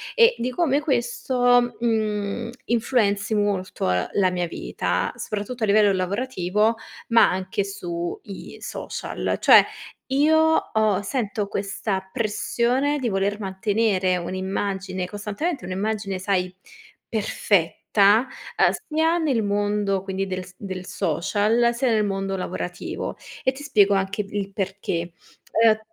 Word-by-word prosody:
e 470 0 +6
di 250 - -2
come 290 -1 +2
questo, 245 -3 +2
mhmm, 220 -1 -1 0.2
influenzi 220 -3 +1
molto, 200 - 0
ehm, 90 0 0
la 190 -2 +3
mia 180 -1 -1
vita, - - -2
soprattutto 215 +3 -4
a - - +5
livello 205 0 +5
lavorativo, 200 +2 0 0.3
ma 230 -1 +5
anche 190 +2 -2
su 175 -3 -4
i 195 - -9
social. - - -4
Cioè, - - +8 0.4
io 290 +4 +4 0.4
ho 215 -3 +2
sento 210 -2 -2
questa 200 -1 -3
pressione 245 +6 0
di 255 - -1
voler 200 +1 0
mantenere 195 -1 +1
un'immagine 190 +1 -3
costantemente, 210 - -3
un'immagine, 195 +1 -2
sai, 185 -1 0 0.5
perfetta, 200 -5 0 0.8
ehm, - - +5 0.2
sia 320 +2 +2
nel 280 -8 +1
mondo, 205 -1 0
quindi, 195 0 -3
del 185 -1 -3
s 180 - -15
del 185 -2 -6
social, 205 +8 +1
sia 250 +2 0
nel 215 -1 +2
mondo 195 -1 -2
lavorativo 180 -1 -4 0.3
e 260 - +2
ti 275 +2 -10
spiego 205 -8 +4
anche 195 +2 0
il 200 -1 -4
perché. 190 -3 -3 0.5
Uhm, 220 -1 +5
205 Hz, 125 wpm, -24 LUFS, 190-235 Hz, 0.8 s, Cioè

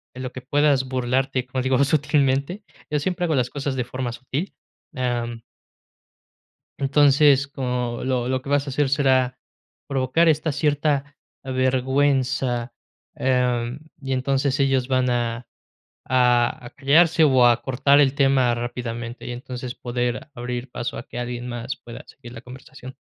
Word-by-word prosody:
en 130 - -6
lo 130 - -5
que 130 - -7
puedas 145 0 +2
burlarte, 130 0 0
como 130 0 -2
digo, 130 +1 +2
sutilmente. 140 +5 +1 0.3
Yo 150 - +1
siempre 180 +3 -1
hago 160 -3 0
las 125 -1 +1
cosas 140 -1 -3
de 125 - -1
forma 125 -1 -4
sutil, 135 +9 -5 0.4
am 120 -2 -2 1.4
Entonces, 140 0 +4
como 125 -3 -3
lo 125 -2 -1
lo 130 0 -1
que 140 - -7
vas 145 0 +2
a - - -4
hacer 135 0 0
será 130 -3 +2 0.5
provocar 135 +5 +2
esta 155 0 +1
cierta 145 -1 0 0.3
vergüenza, 130 -1 0 0.4
em, 125 -1 0 0.2
y 135 -1 -4
entonces 135 +1 0
ellos 135 -2 +2
van 130 -1 +1
a 120 0 -1 0.6
a 125 -1 +2
a - - -9
callarse, 155 +5 +4
o 130 -4 +5
a 120 0 +3
cortar 140 +3 +3
el 140 -1 +3
tema 135 -3 +3
rápidamente. 120 0 -5
Y 125 - -4
entonces 125 0 -6
poder 120 +2 -3
abrir 120 +1 -5
paso 120 - -4
a - - -7
que 120 - -8
alguien 120 0 -4
más 120 +2 -5
pueda 120 -1 -10
seguir 120 0 -13
la 115 0 -10
conversación. 130 0 -12
130 Hz, 150 wpm, -23 LUFS, 125-140 Hz, 1.4 s, o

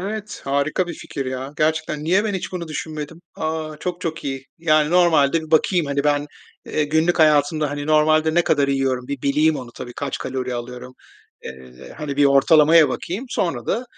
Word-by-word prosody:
Evet, 210 +2 -5
harika 140 +6 0
bir 175 - -6
fikir 135 -3 -6
ya. 130 +2 -5
Gerçekten, 155 -1 -1
niye 190 +6 +2
ben 205 -2 -2
hiç 190 - -5
bunu 170 -3 -5
düşünmedim? 155 +1 -6
A, 155 -1 -4
çok 180 -1 -4
çok 165 -5 -4
iyi. 135 -1 -5
Yani, 155 -2 +2
normalde 160 -3 +3
bakayım, 160 +1 +2
hani, 140 +1 -1
ben, 145 0 +1 0.4
eee, 150 - 0
günlük 160 +4 +1
hayatımda, 150 -1 +3
hani, 145 0 -5
normalde 155 +1 +3
ne 175 - +3
kadar 140 -1 +2
yiyorum, 135 -2 -1
bir 140 -2 -5
bileyim 150 +2 +2
onu 120 -2 -8
tabii, 120 - -8
kaç 140 +2 -4
kalori 130 -1 -4
alıyorum, 125 +1 -7 0.5
eee, 65 -1 -11
hani, 140 -2 -5
bir 145 - +4
ortalamaya 150 +3 +5
bakayım. 195 +10 -4
Sonra 135 - -2
da, 245 - -1
150 Hz, 180 wpm, -21 LUFS, 140-165 Hz, 0.5 s, ortalamaya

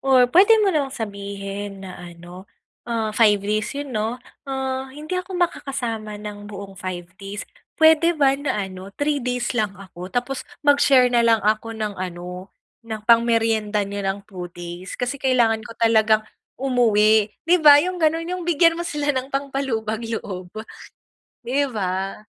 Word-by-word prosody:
or 260 -2 +6
puwede 400 +6 +7
mo 385 - +2
namang 280 -3 -1
sabihin 200 -1 -6
na 185 - -9
ano, 175 +2 -11 0.4
ah 225 -2 -1
5 215 -2 +5
days 215 +2 0
'yon, 285 -2 -5
'no? 220 +3 -1 0.3
"Ah, 265 0 -3
hindi 300 +5 -9
ako 370 0 -7
makakasama 240 -11 -2
ng 205 0 -8
buong 200 -1 -8
5 180 -2 -5 0.2
days. 200 +1 -6 0.3
Puwede 320 +1 +5
ba 275 -2 +4
na 285 - -1
ano, 185 0 -9
3 290 -1 0
days 250 0 -1
lang 210 -4 -1
ako 185 -2 -10
tapos 250 +2 -2 0.2
mag-share 280 -3 +5
na 240 - +4
lang 230 -1 +4
ako 220 +1 0
ng 210 -2 -3
ano, 180 +1 -6 0.3
ng 220 -1 -6
pang-merienda 225 -3 +3
n'yo 200 +1 -5
ng 195 +1 -2
2 180 -3 -8
days? 175 +1 -8
Kasi 250 +3 -3
kailangan 235 -4 +2
ko 230 +1 -11
talagang 220 -1 +3 0.3
umuwi." 220 -5 +3 0.2
'Di 350 +2 +5
ba? 295 -2 +9
Yung 365 -1 -3
gano'n. 325 +1 +2
Yung 365 -1 -3
bigyan 330 0 +4
mo - - 0
sila 295 -3 -1
ng 260 0 -3
pangpalubag 270 -6 -2
loob, 185 -5 -5 1.0
'di 275 +3 +1
ba? 195 -3 -3
225 Hz, 160 wpm, -22 LUFS, 200-270 Hz, 1.0 s, ba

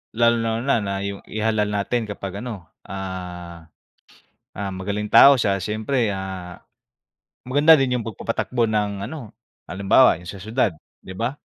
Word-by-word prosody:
lalong-lalo 115 +1 +2
na 100 0 -3
yung 100 0 -4
ihalal 110 -1 0
natin 105 +3 -1
kapag 100 -1 -6
ano, 105 -8 -7 0.2
ah, 90 -3 -7 0.8
ah, 100 -1 -5
magaling 100 +3 -3
tao 140 +2 +8
siya 100 -3 +2
siyempre, 110 +2 -1
ah, 95 -2 -6 0.9
maganda 145 +4 +6
din 125 -2 +1
yung 115 - -6
pagpapatakbo 115 +2 -1
ng 105 -2 -1
ano, 130 -6 -8 0.4
halimbawa 100 +2 +4
yung 90 +1 -12
sa 100 -2 -8
siyudad, 110 -1 0 0.3
'di 95 - -9
ba? 120 +8 -3
105 Hz, 135 wpm, -22 LUFS, 95-115 Hz, 0.9 s, tao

